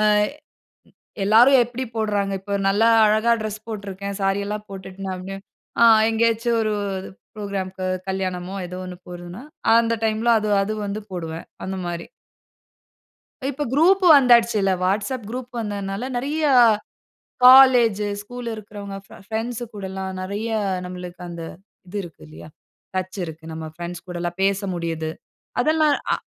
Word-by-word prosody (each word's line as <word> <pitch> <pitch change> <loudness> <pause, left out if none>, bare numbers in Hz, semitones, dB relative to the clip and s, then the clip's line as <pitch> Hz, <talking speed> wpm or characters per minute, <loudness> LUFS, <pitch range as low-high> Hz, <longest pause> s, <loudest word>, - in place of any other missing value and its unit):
அ - - +2 1.2
எல்லாரும் 245 +6 +6
எப்படி 245 +2 -5
போடுறாங்க. 205 -2 0
இப்போ 200 +1 -7 0.2
நல்லா 210 +4 +4 0.2
அழகா 215 +2 +3
டிரெஸ் 215 0 -5
போட்டு 210 -2 -6
இருக்கேன். 200 +1 -5
சாரி 195 +1 +1
எல்லாம் 210 0 -5
போட்டுட்டு. 190 0 -6 0.5
ஆ - - +9 0.3
எங்கயாச்சு 230 +1 +1
ஒரு 215 -1 0 0.6
புரோகிராம்க்கு 190 -3 -4 0.2
கல்யாணமோ 185 -1 -3
ஏதோ 180 +1 -7
ஒன்னு 180 0 -7
போறதுன்னா, 175 +5 -8 0.3
அந்த 230 0 +3
டைம்ல 220 +2 +1
அது 215 - -2
அது 210 - -2
வந்து 200 +2 -3
போடுவேன். 165 -2 -5 0.2
அந்த 190 0 -4
மாரி. 170 -1 -4 1.4
இப்போ 290 +2 -3
குரூப் 370 +6 +4
வந்தாச்சுல்ல. 235 -6 +4
WhatsApp 205 +7 -1
குரூப் 250 +1 -6
வந்ததனால 205 +1 -3
நிறைய 290 +5 -2 1.0
காலேஜ், 250 -5 +8 0.2
ஸ்கூல் 245 +3 -8
இருக்கறவங்க 205 -2 -8
ப் - - -14
பிரெண்ட்ஸ் 225 +2 -3
கூடல்லாம் 190 -2 -5
நிறைய 200 +4 -4 0.4
நம்மளுக்கு 180 0 -8
அந்த 170 -1 -7 0.5
இது 205 +3 -6
இருக்கிறது 165 - -12
இல்லையா? 80 +2 -12 0.5
டச் 185 +1 -3
இருக்கு. 160 -1 -8
நம்ம 160 0 -6
பிரெண்ட்ஸ் 175 0 -7
கூட 180 -1 -5
எல்லாம் 175 0 -3
பேச 195 0 +2
முடியுது. 165 -2 -3 0.5
அதெல்லாம் 310 +1 +3 0.2
ஆ - - +3
200 Hz, 130 wpm, -22 LUFS, 185-230 Hz, 1.4 s, ஆ